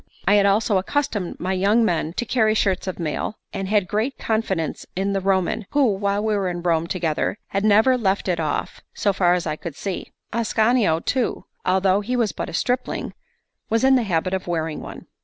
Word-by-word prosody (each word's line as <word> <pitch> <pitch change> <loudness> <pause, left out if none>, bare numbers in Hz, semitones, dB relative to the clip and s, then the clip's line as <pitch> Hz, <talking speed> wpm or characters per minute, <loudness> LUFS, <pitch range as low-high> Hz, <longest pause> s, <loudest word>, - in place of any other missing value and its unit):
I 200 - +5
had 200 -1 +5
also 200 0 +3
accustomed 205 -3 -2
my 185 +1 -1
young 205 +5 +3
men 165 -4 0
to 240 - -2
carry 220 -2 +2
shirts 190 -3 +1
of 185 - -3
mail, 165 +5 -3 0.2
and 195 - -3
had 205 -2 +2
great 220 +8 -1
confidence 195 -7 -1
in 195 +2 0
the 195 - 0
Roman, 190 +2 0
who, 280 -6 +4
while 200 +1 -1
we 215 -1 +1
were 195 -2 0
in 175 -1 -5
Rome 165 -1 +1
together, 170 +2 -1
had 195 +1 -1
never 220 +5 +4
left 195 -3 0
it 175 -2 0
off, 155 -2 -2
so 200 - +1
far 180 -2 +3
as 180 - -2
I 155 -1 -2
could 165 -3 -7
see; 195 +3 -5 0.2
Ascanio 220 -5 +2
too, 255 -2 -1 0.2
although 190 +1 +3
he 245 +5 -2
was 230 -5 +1
but - - -5
a - - -9
stripling, 245 +8 -1 0.6
was 225 +2 +1
in 265 0 +6
the 255 - +3
habit 185 -3 -1
of 190 -1 -2
wearing 160 -2 -2
one. - - -9
195 Hz, 205 wpm, -22 LUFS, 180-220 Hz, 0.6 s, in